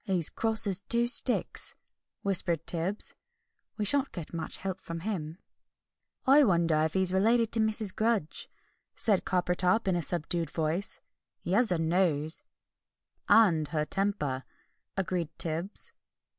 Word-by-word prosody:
"He's 185 -7 +1
cross 225 -1 +1
as 195 -2 +1
two 235 +4 +1
sticks!" 245 +1 +3 0.5
whispered 175 -4 +2
Tibbs; 180 +5 -1 0.6
"we 210 - -1
shan't 275 +5 +4
get 170 -3 -8
much 165 -2 -2
help 190 0 -5
from 165 -2 -7
him." 165 -5 -4 0.9
"I 280 +3 +6
wonder 170 - +2
if 160 +2 -1
he 190 - +2
is 185 0 +1
related 225 +4 +2
to 230 - 0
Mrs. 220 -2 -1
Grudge," 215 -8 -1 0.5
said 205 -5 +2
Coppertop 180 +3 +1
in 185 - +2
a 175 - 0
subdued 170 -1 0
voice; 165 +5 -2 0.4
"he - - -5
has 225 +5 +3
her 180 - +1
nose 160 -2 0 0.5
" - - -29
"And 170 -9 +5
her 150 +1 -2
temper," 150 -9 -2 0.5
agreed 180 -4 -2
Tibbs. 170 +5 -3
185 Hz, 145 wpm, -29 LUFS, 165-210 Hz, 0.9 s, I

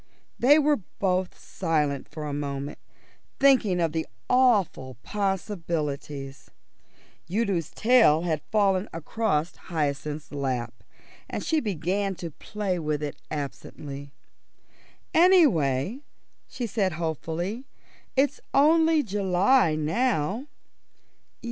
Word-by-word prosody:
They 285 +5 +6
were 300 -1 +3 0.2
both 185 -1 0
silent 150 -6 -1
for 155 -1 -6
a 145 - -4
moment, 140 0 -4 0.6
thinking 255 -10 +4
of 165 -2 +1
the 160 0 -2 0.2
awful 205 - +2
possibilities. 160 - -3 0.8
Udo's 195 -6 0
tail 220 -10 +4
had 160 -4 -1
fallen 200 -2 +2
across 165 -1 -1
Hyacinth's 150 -2 -3
lap, 130 -5 -2 0.6
and - - -4
she 320 - +1
began 195 - -1
to 170 -2 -6
play 195 +2 -3
with 150 -2 -2
it 145 - -5
absently. 140 -1 -6 1.0
"Anyway," 240 - +4 0.5
she 245 - -4
said 200 -5 0
hopefully, 170 - -3 0.5
"it's 275 +1 +1
only 320 +2 +5
July 195 -1 +2
now." 200 - 0
175 Hz, 100 wpm, -26 LUFS, 150-225 Hz, 1.0 s, They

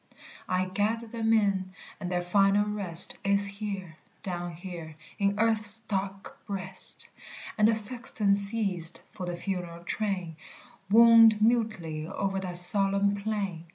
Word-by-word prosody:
"I 185 0 +1
gather 205 +5 -1
them 225 0 -2
in, 195 -4 +1 0.3
and 180 - -4
their 175 -1 -1
final 195 +3 +3
rest 195 -5 +3
Is 200 0 +2
here, 200 -5 -6 0.3
down 175 -2 -4
here, 165 -2 -8 0.2
in 200 0 +1
earth's 220 -1 +2
dark 195 -2 -5
breast!" 190 -2 -4 0.5
And 210 -1 +4
the 225 - +3
sexton 220 -2 -1
ceased, 200 -4 -1
for 180 - -7
the 175 -1 -4
funeral 175 -2 -5
train 185 -4 -3 0.5
Wound 225 0 +7
mutely 215 -9 0
o'er 195 +2 -2
that 180 -2 0
solemn 200 +2 +3
plain! 200 -5 -3
200 Hz, 130 wpm, -28 LUFS, 180-215 Hz, 0.5 s, Wound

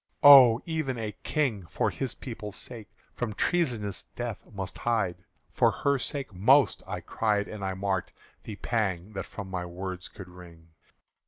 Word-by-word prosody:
"Oh! 130 -5 +10
even 155 -6 -2
a 110 -2 -3
King, 115 - -1
for - - 0
his 135 -2 -4
people's 105 -5 -7
sake, 115 -4 -7 0.2
From 115 -4 -4
treasonous 120 - 0
death 120 -3 -4
must 100 -3 -6
hide!" 95 -7 -1 0.3
"For - - +4
her 140 -1 0
sake 135 -4 -4
most!" 130 +10 +4
I - - -4
cried, 105 -2 0
and 105 -2 -7
I 95 -1 -2
marked 95 -1 -2 0.3
The 105 - -7
pang 100 -3 -2
that 95 - -5 0.2
my 95 -2 -4
words 90 +1 -6
could 95 - -11
wring. 85 -2 -14
105 Hz, 155 wpm, -28 LUFS, 95-125 Hz, 0.3 s, Oh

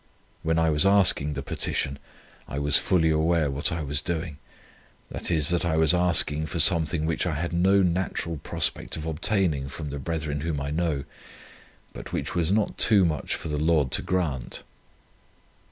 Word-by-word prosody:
When 80 0 0
I 80 -1 +2
was 75 0 +5
asking 95 -7 +4
the 70 -1 -5
petition, 70 0 -1 0.5
I 70 - -6
was 70 0 +1
fully 80 -3 +1
aware 80 -1 +1
what 70 +1 0
I 80 -1 -3
was 75 +1 -1
doing, 80 -4 -4 0.7
i. - - -5
e., 85 -3 +1
that 85 +4 +2
I 80 -2 0
was 80 0 +4
asking 85 -3 +1
for 85 - -5
something 80 -1 +4
which 85 +2 -1
I 80 - -2
had 85 +3 -3
no 95 +3 +3
natural 85 -2 -2
prospect - - -2
of 80 - -6
obtaining 80 -3 -1
from 75 +1 -7
the 70 - -5
brethren 75 -1 -4
whom 80 -2 -3
I 70 +1 -4
know, 80 -3 -1 0.9
but - - -9
which - - -3
was 85 0 0
not 105 0 0
too 100 -5 +5
much 80 -3 -2
for 80 - -7
the 75 -1 -3
Lord 80 -5 +2
to - - +1
grant." 80 -9 -3
80 Hz, 180 wpm, -25 LUFS, 75-85 Hz, 0.9 s, was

